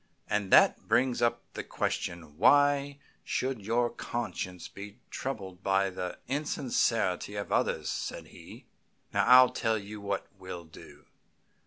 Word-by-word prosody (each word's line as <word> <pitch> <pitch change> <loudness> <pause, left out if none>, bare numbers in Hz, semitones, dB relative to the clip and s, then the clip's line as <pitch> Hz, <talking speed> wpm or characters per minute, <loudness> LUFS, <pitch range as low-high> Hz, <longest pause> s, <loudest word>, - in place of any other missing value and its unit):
"And 105 -2 -1
that - - +5
brings 125 -1 +2
up 120 0 +1
the - - -5
question, 80 -4 -3
why 145 0 +4 0.3
should 130 -3 -2
your 120 +3 +1
conscience 95 -6 -5
be 100 +2 -10
troubled 95 -9 -5
by 95 0 +2
the 90 -1 -5
insincerity 120 -8 0
of 100 0 -5
others?" - - 0
said - - -5
he. - - -13 0.5
"Now, - - +2
I'll 125 0 +9
tell 110 -1 0
you 105 0 -8
what 100 0 -2
we'll 90 -2 -7
do. 80 - -15
105 Hz, 135 wpm, -30 LUFS, 95-125 Hz, 0.5 s, I'll